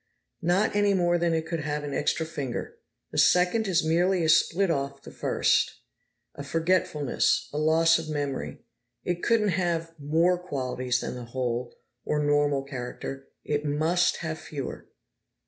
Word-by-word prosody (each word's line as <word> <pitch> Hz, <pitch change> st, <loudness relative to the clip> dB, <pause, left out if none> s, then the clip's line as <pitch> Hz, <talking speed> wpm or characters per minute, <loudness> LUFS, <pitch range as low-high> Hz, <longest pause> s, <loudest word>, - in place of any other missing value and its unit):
"Not 180 Hz, +5 st, +2 dB
any 205 Hz, -1 st, +3 dB
more 175 Hz, -1 st, +2 dB
than 170 Hz, -1 st, +1 dB
it 160 Hz, 0 st, -1 dB
could 165 Hz, 0 st, -3 dB
have 150 Hz, 0 st, -3 dB
an 145 Hz, -1 st, -4 dB
extra 155 Hz, +3 st, 0 dB
finger! 140 Hz, -6 st, -5 dB, 0.3 s
The -, -, -1 dB
second 180 Hz, +5 st, +4 dB
is 175 Hz, -3 st, +2 dB
merely 175 Hz, +3 st, +2 dB
a 160 Hz, -, +1 dB
split 170 Hz, +3 st, +3 dB
off 140 Hz, -2 st, -3 dB
the -, -, -10 dB
first, -, -, +1 dB, 0.6 s
a -, -, -8 dB
forgetfulness, 160 Hz, -3 st, +1 dB
a 150 Hz, -, -1 dB
loss 165 Hz, +1 st, +4 dB
of 160 Hz, -1 st, -7 dB
memory. 140 Hz, -, -4 dB, 0.4 s
It 175 Hz, -1 st, -2 dB
couldn't 225 Hz, -3 st, +2 dB
have 170 Hz, -2 st, -1 dB
more 165 Hz, +5 st, +2 dB
qualities 130 Hz, -7 st, -2 dB
than -, -, -4 dB
the 125 Hz, -1 st, -7 dB
whole, 120 Hz, 0 st, -3 dB, 0.3 s
or 150 Hz, -, -1 dB
normal, 145 Hz, -1 st, +2 dB
character; 135 Hz, 0 st, -6 dB, 0.2 s
it 150 Hz, 0 st, -1 dB
must 155 Hz, +4 st, +1 dB
have 160 Hz, 0 st, -3 dB
fewer." 140 Hz, -4 st, -7 dB
160 Hz, 155 wpm, -27 LUFS, 140-175 Hz, 0.6 s, second